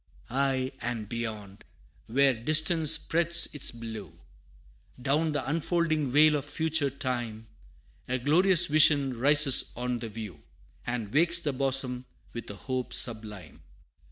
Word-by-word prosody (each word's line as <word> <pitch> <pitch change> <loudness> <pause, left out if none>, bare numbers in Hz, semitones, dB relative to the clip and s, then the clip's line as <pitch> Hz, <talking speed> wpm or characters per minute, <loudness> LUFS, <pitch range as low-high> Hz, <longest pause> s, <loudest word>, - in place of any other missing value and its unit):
Aye 130 0 -2
and 115 -3 -5
beyond, 110 -4 -7 0.4
where 135 +3 +2
distance 155 +6 +1
spreads 170 +1 +2
its 145 - +3
blue, 115 -3 -9 0.8
Down 145 +5 -1
the 145 -3 -4
unfolding 155 -1 -2
vale 150 +3 +3
of 140 - -7
future 155 -1 -2
time, 120 -4 -6 0.6
A 130 - -2
glorious 175 +7 +3
vision 145 -4 +4
rises 145 0 +5
on 125 0 -4
the 115 -1 -7
view, 105 -8 -10 0.5
And 115 -4 -5
wakes 170 +3 +2
the 155 -4 -4
bosom 130 -1 0 0.3
with 120 - -8
a 100 - -8
hope 125 +2 -6
sublime. 110 -9 0
130 Hz, 130 wpm, -26 LUFS, 120-155 Hz, 0.8 s, rises